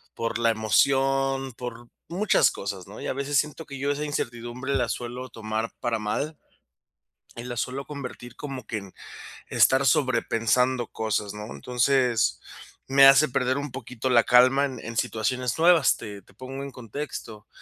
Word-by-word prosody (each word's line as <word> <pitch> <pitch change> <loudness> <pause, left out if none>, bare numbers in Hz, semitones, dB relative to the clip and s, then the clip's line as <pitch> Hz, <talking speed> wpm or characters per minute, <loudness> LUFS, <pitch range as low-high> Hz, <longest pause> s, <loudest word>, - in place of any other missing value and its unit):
por 115 -1 -2
la 115 0 +3
emoción, 135 +4 +2
por 120 -1 -8 0.2
muchas 195 +4 +3
cosas, 95 -2 -6
¿no? 105 - -10
Y, - - -4
a - - 0
veces 140 +2 -1
siento 150 +2 -1
que 140 - -8
yo, 140 +2 0
esa 145 +1 -2
incertidumbre 120 -1 -4
la 120 - +1
suelo 125 +1 -5
tomar 110 0 -3
para 120 -3 -1
mal, 140 +9 -3 1.0
y 120 - -6
la 120 -1 -5
suelo 130 +4 -3
convertir 125 -4 -8
como 135 -5 -7
que 110 - -3
en 100 -2 -11 0.6
estar 135 +1 +4
sobrepensando 125 -2 +2
cosas, 105 -2 -2
¿no? 105 0 -7
Entonces, 125 - +1 0.5
me 135 0 +7
hace 140 +3 +7
perder 130 0 0
un 145 -1 -4
poquito 125 0 -5
la 120 -2 +6
calma 130 +3 +5
en 130 -3 -6
en 115 - -7
situaciones 120 +3 -1
nuevas. 165 -3 +5
Te 105 -3 -8
te 95 - -23
pongo 130 +3 -7
en 140 - -7
contexto, 115 -3 -7
125 Hz, 165 wpm, -26 LUFS, 115-135 Hz, 1.0 s, me